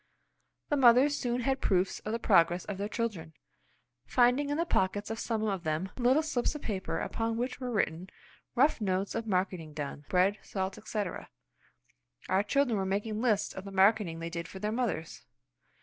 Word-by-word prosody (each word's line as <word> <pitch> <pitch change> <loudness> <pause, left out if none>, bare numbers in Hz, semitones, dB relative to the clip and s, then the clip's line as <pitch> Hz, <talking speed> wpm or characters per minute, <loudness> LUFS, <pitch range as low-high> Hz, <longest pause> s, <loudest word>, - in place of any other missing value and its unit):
The 290 - +2
mothers 260 +3 +6
soon 245 -2 -1
had 265 +2 0
proofs 185 0 +1
of 215 - -5
the 230 - 0
progress 175 -5 +3
of 195 -2 -5
their 205 +1 -2
children; 200 -10 -3 0.7
finding 255 +3 +3
in 290 - 0
the 335 - +1
pockets 205 - 0
of 225 - -4
some 225 -2 -1
of 195 -5 -1
them 160 +4 -2
little 260 +5 +3
slips 300 -2 -1
of 300 - -7
paper 195 -4 -3
upon 225 0 -2
which 250 +3 -3
were 255 -1 -4
written 185 -5 -1 0.5
rough 270 0 +3
notes 195 -1 -1
of 225 0 -3
marketing 180 -5 -1
done; 145 -1 -5
bread, 190 +3 +2
salt, 190 +1 -4
etc. 210 -2 -4 1.0
Our 190 +1 +3
children 245 -1 +1
were - - 0
making 210 +3 -2
lists 220 -5 +1
of 190 - -7
the 195 - -8
marketing 195 -3 +3
they 165 0 -5
did 170 0 -4
for - - -10
their 210 +2 -2
mothers! 215 -9 -3
210 Hz, 180 wpm, -30 LUFS, 185-240 Hz, 1.0 s, mothers